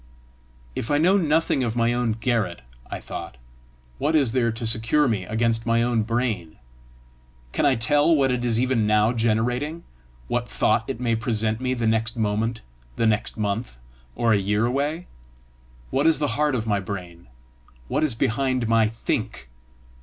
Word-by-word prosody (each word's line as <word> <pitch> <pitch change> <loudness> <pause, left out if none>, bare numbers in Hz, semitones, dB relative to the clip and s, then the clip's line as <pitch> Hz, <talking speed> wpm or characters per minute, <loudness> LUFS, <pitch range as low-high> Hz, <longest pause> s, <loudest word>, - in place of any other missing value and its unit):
"If 110 - -4
I 145 - +3
know 175 +6 +4
nothing 160 -6 +2
of 115 -2 -2
my 115 0 +2
own 120 -2 0
garret," 115 - -1 0.3
I - - -5
thought, - - -8 0.6
"what 160 - +1
is 140 -7 +3
there 120 -2 +1
to 115 +1 -5
secure 115 +6 +2
me 105 -6 -1
against 115 +2 0
my 115 0 +3
own 120 -2 +1
brain? 110 -7 -2 1.0
Can 145 - +2
I 135 - +3
tell 145 +7 +3
what 135 -3 +2
it 125 -1 -1
is 115 -2 +1
even 125 -4 +1
now 105 +2 +3
generating? 125 +8 0 0.4
what - - -2
thought - - +1
it - - -4
may 120 -2 +1
present 110 -1 -1
me 130 0 0
the 120 -2 -2
next 110 +1 +1
moment, 110 +2 -1 0.3
the 115 - 0
next 110 0 0
month, 105 - -3 0.4
or 115 -1 +2
a - - +4
year 105 +3 +1
away? 145 +7 -1 0.9
What 140 +4 +2
is 165 - +5
at 150 - -4
the 145 -5 +1
heart 150 +1 +1
of 115 -3 -2
my 105 -2 +1
brain? 90 -3 -7 0.6
What - - 0
is 140 -7 0
behind 130 0 0
my 115 -1 +4
THINK? 110 - -3
115 Hz, 175 wpm, -24 LUFS, 110-130 Hz, 1.0 s, is